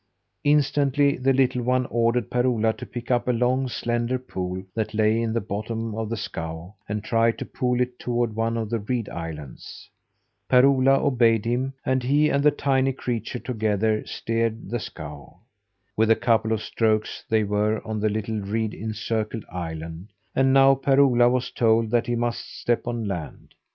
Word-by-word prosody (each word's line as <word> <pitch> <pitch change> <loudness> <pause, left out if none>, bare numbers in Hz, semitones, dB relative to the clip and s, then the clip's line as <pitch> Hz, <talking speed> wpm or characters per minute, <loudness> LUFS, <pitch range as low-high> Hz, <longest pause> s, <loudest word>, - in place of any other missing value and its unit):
Instantly, 145 -1 +3
the 130 +1 +1
little 130 -1 +2
one 125 +1 +1
ordered 115 0 +1
Per 125 0 +2
Ola 115 -3 +2
to - - -9
pick 120 +1 -6
up 120 0 +1
a - - +4
long, 125 +2 +1
slender 120 +1 -1
pole 95 -7 -5
that 110 -1 -3
lay 110 +1 +3
in 115 -1 -1
the 115 - 0
bottom 110 +3 -4
of 110 0 -3
the 115 - -2
scow, 80 0 -6 0.2
and 105 0 -3
try 115 0 +3
to - - -7
pole 125 -2 -1
it 125 0 -1
toward 120 -2 -1
one 115 +1 0
of 110 -1 -3
the 115 - 0
reed 115 +1 -2
islands. 80 -5 -8 0.6
Per 125 0 +6
Ola 135 0 +4
obeyed 115 -5 +3
him, 125 +3 -1
and 130 0 +1
he 145 +4 +3
and 140 -1 +1
the 150 - +7
tiny 135 -2 +1
creature, 120 -2 -3
together, 110 -3 0
steered 115 0 -2
the 120 - -1
scow. 75 -5 -9 0.6
With 110 0 +2
a 115 - +6
couple 110 -1 +1
of 110 -1 0
strokes 110 -2 0
they 110 -1 +3
were 105 +1 0
on 110 -1 -3
a 110 - +3
little 110 +1 -2
reed 110 +2 -2
encircled 110 0 -3
island, 80 +2 -6 0.2
and 135 0 +3
now 135 0 +6
Per 135 0 +2
Ola 120 -3 +5
was 125 0 -1
told 115 -1 +2
that 120 -1 +2
he 120 - 0
must 120 0 -3
step 120 0 0
on 120 -3 -2
land. 90 -5 -6
115 Hz, 180 wpm, -24 LUFS, 110-125 Hz, 0.6 s, the